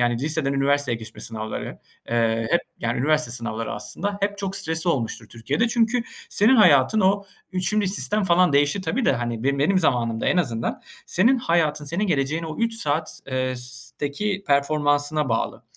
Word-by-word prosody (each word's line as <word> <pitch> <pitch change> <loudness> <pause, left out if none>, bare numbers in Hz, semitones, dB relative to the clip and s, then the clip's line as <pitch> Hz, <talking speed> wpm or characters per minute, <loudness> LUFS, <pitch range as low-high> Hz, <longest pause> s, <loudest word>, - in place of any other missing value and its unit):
yani, 120 0 +2
liseden 150 -2 +1
üniversiteye 140 -2 +1
geçme 110 0 -11
sınavları, 110 -1 -5 0.3
eee, 115 -1 +1
hep, 170 - +3 0.2
yani, 120 +1 -2
üniversite 155 0 +2
sınavları 115 -2 -3
aslında, 205 0 -3
hep 200 0 -1
çok 195 -1 -2
stresli 165 -2 0
olmuştur 115 -5 -2
Türkiye'de 120 - -1
çünkü 230 +1 +1 0.3
senin 230 +6 +4
hayatın 165 - +5
o 200 +1 +2 0.3
3'üncü 190 +3 0
sistem 205 +1 0
falan 180 -2 +4
değişir 145 +7 +2
tabii 235 +5 -1
de, - - +4
hani, 120 -1 -3
be 140 0 +1
benim 185 +7 +3
zamanımda 120 -8 0
en - - +2
azından 115 -10 -1 0.2
senin 235 +9 +3
hayatın, 155 -7 +1
senin 175 +8 -1
geleceğin 155 0 0
o 155 - -6
3 230 0 0
saat 155 -6 -2
eee, 130 -1 -1
s 125 0 -7
teki 195 +8 -2
performansına 145 0 +1
bağlı 115 - -2
150 Hz, 165 wpm, -23 LUFS, 125-195 Hz, 0.3 s, hayatın